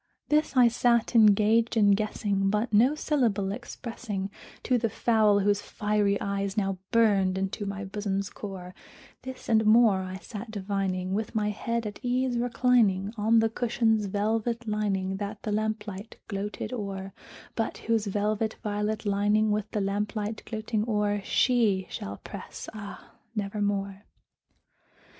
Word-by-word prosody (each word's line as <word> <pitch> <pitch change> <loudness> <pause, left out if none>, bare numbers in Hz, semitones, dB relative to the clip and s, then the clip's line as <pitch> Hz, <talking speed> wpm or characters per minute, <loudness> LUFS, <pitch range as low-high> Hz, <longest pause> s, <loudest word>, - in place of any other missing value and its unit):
This 300 -2 +2
I 245 -1 +8
sat 235 0 +2
engaged 220 +1 +4
in 205 -2 +5
guessing, 200 -1 0
but 210 +3 -1
no 245 +8 +5
syllable 230 -11 0
expressing 215 -3 -5 0.3
To 250 -1 +2
the 230 -1 0
fowl 215 -2 +3
whose 205 0 +2
fiery 210 -1 0
eyes 200 +1 -2
now 195 -2 0
burned 200 -5 +3
into 195 +1 -3
my 200 0 -4
bosom's 195 0 -3
core; 185 -3 -8 0.5
This 260 0 -8
and 220 -1 +4
more 215 -3 +5
I 185 0 -5
sat 210 +4 -8
divining, 190 -3 -2
with 215 +2 -3
my 210 -1 +1
head 230 +2 -2
at 205 -1 -6
ease 250 0 0
reclining 230 -5 +2
On 220 +1 +3
the 225 0 +4
cushion's 225 -3 +1
velvet 225 +4 -1
lining 195 -3 -1
that 205 +1 -5
the 215 - -2
lamplight 215 -1 -3
gloated 205 +3 -4
o'er, 195 -4 -5 0.4
But 225 - -2
whose 225 -2 0
velvet 210 +2 0
violet 210 +1 -2
lining 210 +1 +2
with 210 0 -1
the 210 - -2
lamplight 210 +2 -2
gloating 220 -1 -2
o'er 205 -1 +1
She 220 -7 +2
shall 100 +1 -5
press, - - -8
ah, 205 -2 -9 0.2
nevermore! 200 -1 -2
210 Hz, 140 wpm, -27 LUFS, 200-225 Hz, 0.5 s, I